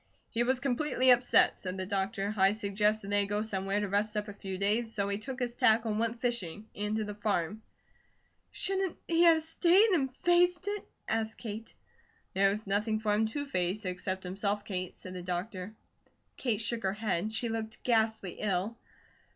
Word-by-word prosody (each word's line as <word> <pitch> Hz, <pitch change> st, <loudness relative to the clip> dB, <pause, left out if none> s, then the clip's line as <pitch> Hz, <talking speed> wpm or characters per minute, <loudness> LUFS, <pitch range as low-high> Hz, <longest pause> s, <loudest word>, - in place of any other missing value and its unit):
"He 230 Hz, -, 0 dB
was 250 Hz, +2 st, +2 dB
completely 260 Hz, 0 st, +2 dB
upset," 245 Hz, 0 st, +5 dB
said 185 Hz, 0 st, -5 dB
the 185 Hz, -, -3 dB
doctor. 195 Hz, +1 st, -1 dB
"I 195 Hz, 0 st, +4 dB
suggested 210 Hz, -1 st, 0 dB
that 205 Hz, -, +3 dB
he 200 Hz, -, +2 dB
go 205 Hz, +1 st, -1 dB
somewhere 195 Hz, -1 st, -1 dB
to 205 Hz, -, -1 dB
rest 210 Hz, +2 st, 0 dB
up 210 Hz, 0 st, -2 dB
a 205 Hz, -, -7 dB
few 195 Hz, -1 st, -6 dB
days, 215 Hz, +4 st, +1 dB
so 200 Hz, -3 st, -1 dB
he 200 Hz, 0 st, -1 dB
took 255 Hz, +4 st, -6 dB
his 245 Hz, -1 st, -1 dB
tackle 220 Hz, 0 st, +4 dB
and 210 Hz, -, -1 dB
went 230 Hz, +1 st, -1 dB
fishing, 220 Hz, -5 st, -2 dB
and 210 Hz, +1 st, -2 dB
to 220 Hz, -, 0 dB
the 210 Hz, 0 st, -5 dB
farm." 205 Hz, -1 st, -1 dB, 0.9 s
"Shouldn't 385 Hz, -2 st, -1 dB
he 335 Hz, 0 st, +2 dB
have 325 Hz, -2 st, +6 dB
stayed 355 Hz, +6 st, +4 dB
and 280 Hz, -8 st, +2 dB
faced 350 Hz, 0 st, +4 dB
it?" 410 Hz, 0 st, -3 dB, 0.2 s
asked 220 Hz, 0 st, -1 dB
Kate. 220 Hz, -1 st, -7 dB, 0.6 s
"There 195 Hz, +1 st, +4 dB
was 210 Hz, +2 st, -3 dB
nothing 210 Hz, +2 st, +1 dB
for 215 Hz, -1 st, 0 dB
him 220 Hz, +1 st, +2 dB
to 285 Hz, +6 st, -4 dB
face, 195 Hz, -4 st, -1 dB
except 185 Hz, +1 st, -3 dB
himself, 200 Hz, +3 st, -2 dB
Kate," 185 Hz, -2 st, -4 dB
said 185 Hz, -, -9 dB
the 180 Hz, -, -6 dB
doctor. 185 Hz, +3 st, -4 dB, 0.6 s
Kate 230 Hz, -4 st, -1 dB
shook 230 Hz, +1 st, -2 dB
her 190 Hz, 0 st, 0 dB
head. 210 Hz, -1 st, -1 dB
She 230 Hz, +2 st, -1 dB
looked 220 Hz, -1 st, -4 dB
ghastly 220 Hz, -5 st, +1 dB
ill. 210 Hz, +3 st, -1 dB
215 Hz, 190 wpm, -31 LUFS, 200-235 Hz, 0.9 s, have